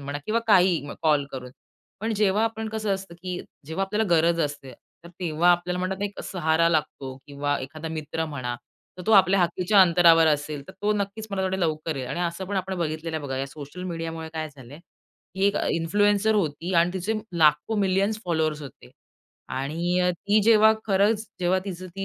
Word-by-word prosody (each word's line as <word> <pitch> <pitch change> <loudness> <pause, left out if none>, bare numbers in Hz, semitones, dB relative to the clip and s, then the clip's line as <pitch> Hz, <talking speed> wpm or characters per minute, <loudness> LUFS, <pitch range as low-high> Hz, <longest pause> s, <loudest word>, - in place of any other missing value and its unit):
म्हणा 140 +1 -5
किंवा 225 +2 +1
काही 185 -6 +4 0.2
कॉल 150 -3 +3
करून. 125 -1 -7 0.5
पण 225 +2 -1
जेव्हा 210 +1 +2
आपण 220 -1 -3
कसं 215 -2 -1
असतं 190 -2 -8
की 180 -1 -4 0.3
जेव्हा 175 +5 -2
आपल्याला 210 +3 0
गरज 165 +1 +3
असते 145 -3 -3 0.3
तर - - -10
तेव्हा 170 0 +2
आपल्याला 175 +1 -1
म्हणतात 190 +2 -3
एक 205 -1 -4
सहारा 165 -2 +2
लागतो 145 -4 -2
किंवा 145 0 -2
एखादा 155 +4 -7
मित्र 160 0 -3
म्हणा, 130 -5 -4 0.4
तर - - -6
तो 220 - +3
आपल्या 195 -1 +6
हाकेच्या 180 +4 +3
अंतरावर 170 -2 +6
असेल 150 -1 0
तर - - -9
तो 210 +1 +2
नक्कीच 205 +1 -3
मला 195 -1 -1
थोडे 190 0 -1
लवकर 155 -2 -1
येईल. 130 -2 -4
आणि 175 - -3
असं 175 +2 -2
पण 200 0 -3
आपण 190 0 -2
बघितलेलं 160 0 -3
आहे 155 - -5
बघा, 135 -1 -3
या 135 - -2
सोशल 145 +5 -9
मीडियामुळे 165 -2 -5
काय 155 0 -3
झालंय 140 -1 -13 0.6
की 195 +1 +2
एक 200 - +1
अ, - - 0
इन्फ्लुएन्सर 205 +5 +2
होती 170 -2 -1
आणि 170 +1 +4
तिचे 190 +4 -1 0.3
लाखो 155 +8 +3
मिलियन्स 200 +2 +1
फॉलोवर्स 155 -3 -1
होते. 120 - -12 0.6
आणि 165 +7 -1
अ, 180 0 +3
ती 200 +4 +1
जेव्हा 220 0 +6
खरंच 210 +2 +2
जेव्हा 180 +1 +2
तीच 185 -2 -6
ती 185 +2 -6
175 Hz, 190 wpm, -25 LUFS, 155-195 Hz, 0.6 s, आपल्या